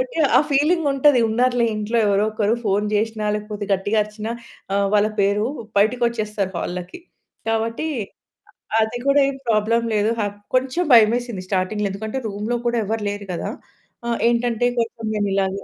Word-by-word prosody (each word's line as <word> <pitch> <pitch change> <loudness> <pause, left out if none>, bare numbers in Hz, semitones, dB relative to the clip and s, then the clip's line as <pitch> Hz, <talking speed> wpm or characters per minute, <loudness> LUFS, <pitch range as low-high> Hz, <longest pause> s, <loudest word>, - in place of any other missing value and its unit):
కాబట్టి - - -3 0.2
ఆ - - +8
ఫీలింగుంటది, 290 -2 +3
ఉన్నారులే 245 +2 +2
ఇంట్లో 215 +2 -1
ఎవరో 200 0 +2
ఒకరు. 215 0 +1
ఫోను 205 0 +1
చేసినా, 215 +1 -1
లేకపోతే 210 0 -4
గట్టిగా 195 +3 0
అరిచినా 210 +1 -6 0.4
ఆహ్, 200 0 +2
వాళ్ళ 210 0 +4
పేరు, 200 +2 +2 0.3
బయటికొచ్చేస్తారు 215 -3 0
హాల్‌లోకి. 180 - -5 0.5
కాబట్టి 225 +6 -1 0.9
అ - - +5
అది 220 +2 -3
కూడా 280 +1 +4
ఏం 275 - -5
ప్రాబ్లమ్ 230 +1 +2
లేదు. 210 0 +2
హా 210 - +1 0.3
కొంచెం 260 +7 +1
భయమేసింది 235 -2 +4
స్టార్టింగ్‌లో. 200 +2 -1
ఎందుకంటే, 220 +6 -4
రూమ్‌లో 210 +3 -3
కూడా 240 0 +1
ఎవరు 220 +1 -2
లేరు 205 0 -5
కదా! 170 - -3 0.6
ఆహ్, 235 -1 0
ఏంటంటే 240 0 +1
కొంచెం 230 -1 -3
మేం 210 -1 0
ఇలాగే 195 0 -1
220 Hz, 150 wpm, -21 LUFS, 205-240 Hz, 0.9 s, ఆ